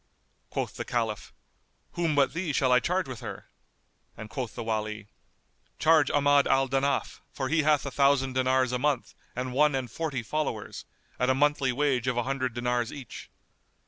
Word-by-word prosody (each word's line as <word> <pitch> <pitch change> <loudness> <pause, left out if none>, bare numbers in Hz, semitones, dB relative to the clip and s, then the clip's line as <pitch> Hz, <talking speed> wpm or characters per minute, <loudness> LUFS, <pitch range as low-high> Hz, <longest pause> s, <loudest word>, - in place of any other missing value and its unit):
Quoth - - -4
the - - -3
Caliph, 110 -4 -2 0.6
"Whom 165 -3 0
but 140 -1 +3
thee 170 -2 -2
shall 130 -1 +2
I 125 - +6
charge 180 +5 -1
with 130 -4 -7
her?"; - - -8 0.7
and 110 0 -9
quoth 125 -3 -4
the 115 - -4
Wali, 110 -2 -3 0.7
"Charge 155 -3 +4
Ahmad 145 -1 +4
al 135 0 +3
Danaf, 135 +2 -1
for 130 -2 -3
he 160 +2 +3
hath 150 -1 +2
a 140 - -4
thousand 140 -1 +2
dinars 130 0 +2
a 125 - -1
month 145 -2 0 0.2
and 125 0 -3
one 150 +1 +3
and 125 -3 -3
forty 145 -4 -3
followers, 135 -4 -3 0.3
at 125 - +2
a 130 - +3
monthly 145 -1 +2
wage 130 -2 0
of 125 -1 0
an 120 - +1
hundred 130 -2 -2
dinars 120 -1 -1
each." 135 -5 -9
130 Hz, 175 wpm, -28 LUFS, 125-145 Hz, 0.7 s, I